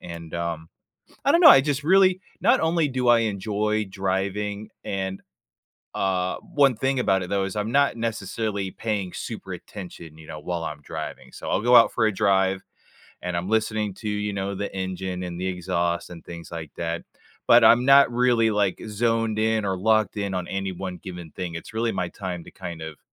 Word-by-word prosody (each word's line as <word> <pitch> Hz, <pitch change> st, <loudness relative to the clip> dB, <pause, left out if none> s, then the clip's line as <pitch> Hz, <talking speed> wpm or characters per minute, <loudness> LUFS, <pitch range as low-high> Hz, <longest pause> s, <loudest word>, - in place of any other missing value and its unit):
and, 85 Hz, -1 st, -9 dB
um, 85 Hz, -1 st, -3 dB, 0.6 s
I 280 Hz, -, +5 dB
don't 335 Hz, -, +4 dB
know, 315 Hz, -, +11 dB
I 135 Hz, -, +9 dB
just 145 Hz, 0 st, -1 dB
really 185 Hz, +2 st, +5 dB, 0.2 s
not -, -, +4 dB
only 160 Hz, -1 st, +2 dB
do 130 Hz, -2 st, -2 dB
I 120 Hz, -, +6 dB
enjoy 105 Hz, 0 st, -1 dB
driving 100 Hz, +2 st, -2 dB
and, 95 Hz, -1 st, -3 dB, 0.7 s
uh, 95 Hz, -1 st, 0 dB
1 140 Hz, -4 st, +2 dB
thing 135 Hz, +4 st, 0 dB
about 95 Hz, -6 st, +2 dB
it, 90 Hz, -, -7 dB
though, 100 Hz, -1 st, +1 dB
is 95 Hz, -, -5 dB
I'm 105 Hz, +2 st, -2 dB
not 140 Hz, 0 st, +3 dB
necessarily 110 Hz, -3 st, -3 dB
paying 105 Hz, -4 st, -3 dB
super -, -, -6 dB
attention, 85 Hz, -5 st, -10 dB
you 80 Hz, -, -14 dB
know, 75 Hz, -, -7 dB
while 85 Hz, +2 st, -3 dB
I'm 75 Hz, -2 st, -5 dB
driving. -, -, -7 dB
So, -, -, -7 dB
I'll -, -, +1 dB
go 120 Hz, +1 st, +5 dB
out 115 Hz, -, +7 dB
for 115 Hz, -, +1 dB
a 110 Hz, -, +3 dB
drive 95 Hz, -1 st, +2 dB, 0.6 s
and 90 Hz, -1 st, -2 dB
I'm 90 Hz, +3 st, -3 dB
listening 110 Hz, -2 st, 0 dB
to, 105 Hz, 0 st, -5 dB
you 105 Hz, 0 st, -2 dB
know, 100 Hz, 0 st, -3 dB
the 100 Hz, +1 st, -4 dB
engine 95 Hz, -1 st, -4 dB
and 85 Hz, -1 st, -5 dB
the 95 Hz, -, -1 dB
exhaust 85 Hz, -1 st, -1 dB
and 85 Hz, -2 st, -10 dB
things 85 Hz, -1 st, -9 dB
like 80 Hz, -3 st, -6 dB
that, 85 Hz, 0 st, -3 dB, 0.4 s
but -, -, +7 dB
I'm 120 Hz, +2 st, +6 dB
not 140 Hz, -1 st, +7 dB
really, 120 Hz, -2 st, +3 dB
like, 105 Hz, -2 st, +1 dB
zoned 115 Hz, 0 st, 0 dB
in 110 Hz, -1 st, +1 dB
or 95 Hz, -1 st, -1 dB
locked 110 Hz, +1 st, +2 dB
in 100 Hz, -1 st, -2 dB
on 90 Hz, -1 st, -3 dB
any 95 Hz, 0 st, -3 dB
1 90 Hz, 0 st, -5 dB
given 90 Hz, -4 st, -9 dB
thing. 90 Hz, -2 st, -5 dB
It's 85 Hz, +6 st, -8 dB
really 115 Hz, +1 st, 0 dB
my 85 Hz, -, -2 dB
time 90 Hz, -3 st, -6 dB
to -, -, -13 dB
kind 85 Hz, -3 st, -8 dB
of, 80 Hz, -2 st, -7 dB
100 Hz, 200 wpm, -24 LUFS, 90-110 Hz, 0.7 s, know